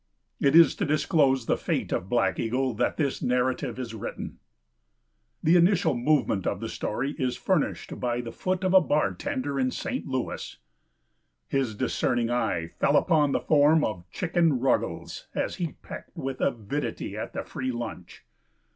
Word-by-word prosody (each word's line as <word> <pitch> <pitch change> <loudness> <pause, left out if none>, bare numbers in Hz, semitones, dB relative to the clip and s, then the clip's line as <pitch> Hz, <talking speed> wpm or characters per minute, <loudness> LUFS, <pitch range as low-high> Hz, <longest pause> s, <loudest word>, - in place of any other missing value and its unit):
It 140 +2 +3
is 165 -2 +8
to - - 0
disclose 145 -4 +2
the - - +1
fate - - -2
of 95 - -2
Black 120 - +1
Eagle 125 +3 0
that 120 +3 0
this 145 -4 -1
narrative 125 0 0
is 125 -3 -5
written. 110 - -6 1.0
The 165 +3 +5
initial 175 -2 +4
movement 125 -6 +1
of - - -1
the - - -4
story 125 +6 -2
is 130 -2 0
furnished - - -1
by 120 -1 -1
the 120 -1 -7
foot 185 +8 -2
of 185 0 +1
a 190 - +8
bartender 155 - -1
in 130 -1 +2
St. 255 - -4
Louis. 130 -2 -4 0.9
His 130 -6 0
discerning 120 +2 0
eye 85 -9 0
fell - - +4
upon 150 -3 +3
the - - 0
form 150 +1 +4
of 90 -4 -3
Chicken 165 -5 +1
Ruggles 130 +1 -1
as - - -2
he 170 -4 -3
pecked - - -9
with 135 0 -4
avidity 125 +3 -2
at - - -5
the - - -3
free 130 0 -4
lunch. 120 -7 -7
135 Hz, 160 wpm, -27 LUFS, 120-155 Hz, 1.0 s, is